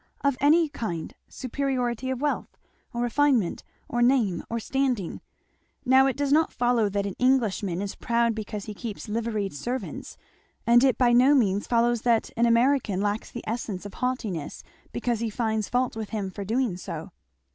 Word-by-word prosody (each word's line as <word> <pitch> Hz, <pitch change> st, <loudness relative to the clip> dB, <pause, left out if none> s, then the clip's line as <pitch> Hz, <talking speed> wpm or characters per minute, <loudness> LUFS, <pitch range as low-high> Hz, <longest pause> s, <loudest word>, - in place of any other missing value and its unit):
"Of 280 Hz, -2 st, +2 dB
any 315 Hz, +3 st, +5 dB
kind 195 Hz, -, -5 dB
superiority 255 Hz, -2 st, -2 dB
of 260 Hz, -1 st, -2 dB
wealth, 295 Hz, 0 st, -2 dB, 0.3 s
or 240 Hz, -1 st, -2 dB
refinement, 245 Hz, -5 st, +2 dB, 0.2 s
or 240 Hz, -, -1 dB
name, 240 Hz, -8 st, +2 dB
or 230 Hz, -, -2 dB
standing. 250 Hz, -6 st, -1 dB, 0.6 s
Now 265 Hz, +1 st, +6 dB
it 270 Hz, -, -1 dB
does 285 Hz, -1 st, 0 dB
not 320 Hz, +2 st, +4 dB
follow 240 Hz, -3 st, +2 dB
that 200 Hz, 0 st, -1 dB
an 200 Hz, -, -3 dB
Englishman 215 Hz, -8 st, +1 dB
is 200 Hz, -, -4 dB
proud 235 Hz, 0 st, +1 dB
because 210 Hz, -2 st, -5 dB
he 215 Hz, -, -6 dB
keeps 215 Hz, 0 st, -7 dB
liveried 215 Hz, -2 st, -2 dB
servants, 240 Hz, -, -5 dB, 0.5 s
and 240 Hz, +1 st, +6 dB
it 265 Hz, -3 st, +3 dB
by 245 Hz, -2 st, +4 dB
no 255 Hz, +4 st, +6 dB
means 205 Hz, -6 st, +2 dB
follows 235 Hz, -1 st, +2 dB
that 235 Hz, -2 st, +1 dB
an 235 Hz, +1 st, +3 dB
American 235 Hz, -4 st, +2 dB
lacks 205 Hz, +2 st, -1 dB
the 240 Hz, -, -7 dB
essence 215 Hz, -4 st, -4 dB
of 205 Hz, -, -8 dB
haughtiness 225 Hz, -, -3 dB, 0.3 s
because 235 Hz, -2 st, -1 dB
he 230 Hz, -1 st, -1 dB
finds 220 Hz, -1 st, -1 dB
fault 250 Hz, -1 st, 0 dB
with 220 Hz, -2 st, -5 dB
him 200 Hz, -4 st, -3 dB
for 200 Hz, -, -6 dB
doing 225 Hz, -2 st, 0 dB
so." -, -, -7 dB
235 Hz, 170 wpm, -26 LUFS, 210-255 Hz, 0.6 s, Now